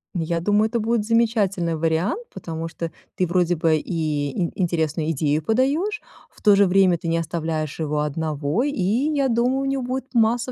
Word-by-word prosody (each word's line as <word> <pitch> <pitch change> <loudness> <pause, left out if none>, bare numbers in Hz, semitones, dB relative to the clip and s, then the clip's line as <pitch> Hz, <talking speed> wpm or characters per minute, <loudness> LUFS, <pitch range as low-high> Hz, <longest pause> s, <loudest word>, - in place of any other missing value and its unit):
Я 170 0 -1
думаю, 210 +5 +2
это 235 +1 -1
будет 225 -1 0
замечательный 210 -7 +1
вариант, 165 - -1
потому 165 0 -5
что 165 0 -5 0.2
ты, 185 - 0
вроде 175 0 +2
бы, 160 0 +2
и 155 -3 -2
и 175 +6 -3
интересную 160 -2 0
идею 150 0 0
подаёшь. 290 - +1 0.3
В - - -22
то 205 -1 +6
же 200 0 +5
время 185 -1 +4
ты 165 - -7
не 165 0 +1
оставляешь 160 -2 -3
его 150 -1 -1
одного. 150 - -1
И 290 - 0
я 270 +8 +1
думаю, 245 +2 +1
у - - -2
него 270 -1 -1
будет 260 +1 -4
масса 235 +2 +2
180 Hz, 185 wpm, -22 LUFS, 160-235 Hz, 0.3 s, то